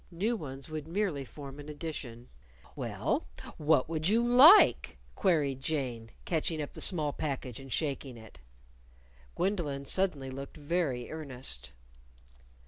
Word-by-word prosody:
New 200 +7 -1
ones 135 - -7
would 155 -1 -6
merely 175 -5 -1
form 140 +1 -10
an 145 +1 -9
addition. 145 -6 -7 0.5
"Well, - - -2 0.3
what 150 -3 +3
would 160 +1 0
you 230 +3 +3
like?" 285 - +7 0.2
queried 145 -8 +1
Jane, 125 -7 -3 0.2
catching 160 -1 -1
up 145 - -5
the - - -8
small 155 -6 +2
package 135 -5 -4
and 135 -1 -11
shaking 140 -4 -2
it. 110 -2 -14 1.0
Gwendolyn 155 -8 -1
suddenly 145 -7 -1
looked 135 +4 -8
very 145 -5 -2
earnest. 130 - +1
145 Hz, 130 wpm, -30 LUFS, 135-165 Hz, 1.0 s, like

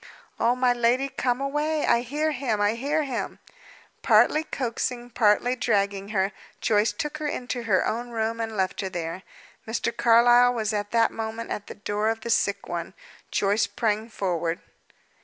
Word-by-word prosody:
"Oh, 240 +1 +3
my 250 -1 +3
lady, 245 +3 +1
come 250 -2 -1
away! 295 +2 0
I 235 - +3
hear 295 +6 -1
him; 245 -6 -1
I 205 +1 +2
hear 285 +6 0
him!" 260 -4 -4 0.6
Partly 310 - +4
coaxing, 245 -3 -3
partly 235 +2 +3
dragging 200 -4 0
her, 195 -2 0 0.3
Joyce 210 0 +2
took 295 +8 -4
her 305 - -2
into 250 -3 -3
her 195 -5 +2
own 240 +2 -2
room, 225 0 -2
and 225 -1 -4
left 190 +1 0
her 190 - -3
there. 170 0 -4 0.5
Mr. 235 +1 -2
Carlyle 240 +1 +5
was 220 -2 -1
at 205 0 -2
that 230 0 +3
moment 225 +1 -5
at 205 - -4
the - - -8
door 205 +1 -1
of 225 0 -2
the 235 - -3
sick - - +1
one. - - -5 0.3
Joyce 205 +2 +1
sprang 215 +2 -1
forward. 175 -5 -2
230 Hz, 170 wpm, -25 LUFS, 210-245 Hz, 0.6 s, Carlyle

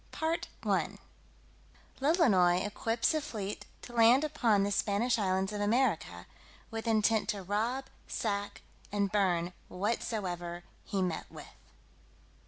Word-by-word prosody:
CHAPTER 325 +1 -2
VII - - 0 1.0
_Lolonois 200 - +4
equips 230 +7 0
a 310 - +1
fleet 210 -8 -5 0.2
to 240 - -10
land 235 +4 +6
upon 230 -9 +2
the 200 - 0
Spanish 220 +4 +1
islands 190 0 0
of 205 - -3
America, 205 - +1 0.5
with 225 +1 -4
intent 220 0 +2
to 200 -2 -2
rob, 225 +8 -1 0.2
sack 205 -2 -3 0.3
and 200 -2 0
burn 180 -4 +1 0.2
whatsoever 180 -4 -2 0.2
he 195 -2 -1
met 175 -3 -2
with. - - -9
210 Hz, 120 wpm, -31 LUFS, 190-235 Hz, 1.0 s, land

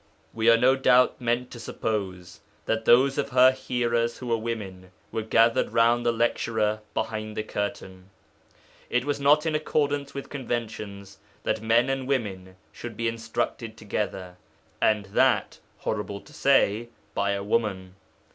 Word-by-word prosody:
We 115 +1 +2
are 115 - +7
no 130 +3 +4
doubt 125 -1 +3
meant 120 +1 -1
to 120 - -9
suppose 95 -7 -4 0.3
that 110 0 -1
those 135 +3 +5
of 140 - -1
her 130 0 +6
hearers 120 -3 -1
who 125 - -8
were 115 - +2
women 100 -5 -5 0.2
were 110 - -2
gathered 115 +1 +2
round 120 +1 +3
the - - +4
lecturer 110 -2 0 0.2
behind 110 -1 -3
the 110 - -1
curtain. 95 -3 -5 0.8
It 125 +1 0
was 145 -1 -1
not 145 +3 +4
in 160 - 0
accordance 145 -2 -1
with 140 - -7
conventions 110 -6 -5 0.2
that 110 - -1
men 115 +3 +3
and 135 -1 -2
women 95 -9 -2 0.2
should 115 -3 -8
be 115 - -1
instructed 115 0 -3
together, 95 -4 -4 0.4
and 105 -2 +2
that 100 - +1 0.2
horrible 105 -2 -3
to 150 - -18
say 120 -6 +2 0.2
by 100 0 0
a 100 0 -3
woman. 100 -4 -1
115 Hz, 150 wpm, -26 LUFS, 105-125 Hz, 0.8 s, are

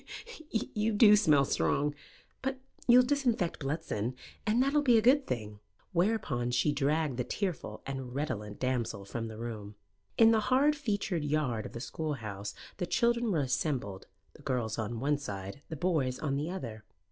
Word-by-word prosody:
"You 220 0 -1
do 210 0 +8
smell 150 -9 +4
strong. 145 +2 +1 0.5
But 265 0 -2 0.3
you'll 250 +1 +8
disinfect 245 -9 0
Bludston, 135 -5 -2 0.3
and 220 +3 +3
that 275 +1 0
will 295 - +4
be 245 -5 +5
a - - +7
good 265 +3 +5
thing." 105 -3 -4 0.3
Whereupon 170 - +1
she 125 +5 +2
dragged 145 -1 0
the 125 - 0
tearful 160 - -4
and 135 -2 -5
redolent 110 -8 -3
damsel 120 -6 -1
from 115 +3 -4
the 110 -1 -8
room. 110 -3 -6 0.4
In 225 0 +7
the 225 - +4
hard 280 +4 +4
featured 205 - -1
yard 145 -7 0
of - - -14
the 115 - -5
schoolhouse 115 -9 -4 0.2
the 180 - -2
children 235 0 +2
were 160 -5 +2
assembled 125 - -2 0.3
the - - -16
girls 120 -5 -2
on 110 +1 -3
one 145 +3 +1
side, 100 -2 -6
the 160 - -4
boys 145 -6 0
on 140 -3 -1
the 150 +4 -2
other. 115 -13 -6
145 Hz, 170 wpm, -31 LUFS, -, 0.5 s, do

